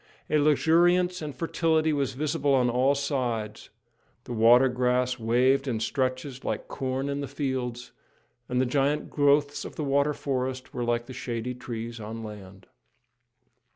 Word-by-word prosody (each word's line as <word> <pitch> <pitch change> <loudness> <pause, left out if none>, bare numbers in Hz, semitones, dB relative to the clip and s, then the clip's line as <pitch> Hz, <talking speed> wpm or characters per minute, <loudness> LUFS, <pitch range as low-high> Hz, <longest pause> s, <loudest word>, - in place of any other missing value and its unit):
A 155 - +4
luxuriance 175 +4 +3
and 150 -2 -5
fertility 160 -1 +1
was 140 -3 -1
visible 145 0 +1
on 125 -2 +2
all 130 +3 +3
sides; 120 -7 -3 0.5
the 125 - -6
water 120 +3 +6
grass 125 0 0
waved 130 +4 +2
in 115 -4 -1
stretches 130 +2 -2
like - - -3
corn 135 0 -3
in 140 0 -2
the 140 - -4
fields, 130 -3 -3 0.6
and 125 0 0
the 130 - +3
giant 140 +3 0
growths 145 0 +2
of - - -8
the 155 - -3
water 140 +1 +1
forests 130 -1 -3
were 120 - -3
like 120 0 0
the 130 - -9
shady 120 0 -4
trees 120 -2 -6
on 110 +1 -6
land. 100 -3 -10
130 Hz, 155 wpm, -27 LUFS, 120-145 Hz, 0.6 s, water